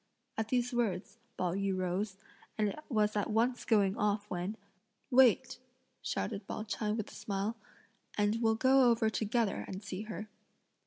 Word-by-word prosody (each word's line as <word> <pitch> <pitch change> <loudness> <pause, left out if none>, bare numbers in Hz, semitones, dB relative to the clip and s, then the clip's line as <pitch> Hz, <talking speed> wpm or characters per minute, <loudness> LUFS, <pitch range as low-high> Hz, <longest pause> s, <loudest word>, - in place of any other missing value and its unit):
At 220 -1 -1
these 245 +1 0
words, 220 -2 -1 0.2
Pao 180 -2 0
yü 195 0 0
rose, 185 +2 -1 0.4
and 210 -2 +1 0.2
was 215 -4 +2
at 205 +1 0
once 235 +3 +1
going 200 -4 +3
off 210 0 0
when 180 +5 -3 0.5
"Wait," 260 0 +5 0.4
shouted 205 -2 -3
Pao 215 - -4
ch'ai 215 0 -2
with 215 - -4
a - - -13
smile, 200 +2 -2 0.6
"and 210 +2 +2
we'll 225 -1 +3
go 260 +2 +5
over 225 -1 +3
together 220 -1 0
and 190 +2 -6
see 195 -1 -5
her." 215 -1 -6
215 Hz, 155 wpm, -33 LUFS, 200-230 Hz, 0.6 s, Wait